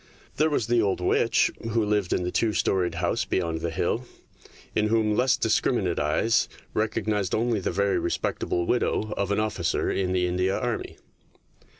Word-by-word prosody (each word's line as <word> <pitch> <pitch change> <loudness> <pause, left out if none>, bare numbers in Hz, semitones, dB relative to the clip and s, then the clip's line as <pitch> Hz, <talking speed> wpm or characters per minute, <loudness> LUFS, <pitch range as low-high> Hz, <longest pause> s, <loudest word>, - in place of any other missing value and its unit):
There 155 +2 +3
was 145 -7 0
the 120 0 +2
old 100 -4 0
witch 90 - +2
who 115 0 0
lived 105 -3 0
in 90 - +1
the 90 - -2
two 110 +2 +1
storied 90 -1 0
house - - 0
beyond 85 -3 -2
the 85 - -1
hill, 90 +9 -1 0.7
in 105 - +1
whom 110 -1 +2
less 125 +2 +3
discriminate 105 -5 +1
eyes 80 +10 +2 0.2
recognised 105 -2 0
only 115 -1 +1
the 95 - -2
very 100 +2 +1
respectable 85 0 -1
widow 110 -2 0
of 100 0 -1
an 100 - +1
officer 100 -6 0
in 95 -1 -1
the 90 -1 +1
India 90 +2 0
Army. 120 -2 -3
105 Hz, 170 wpm, -26 LUFS, 90-115 Hz, 0.7 s, There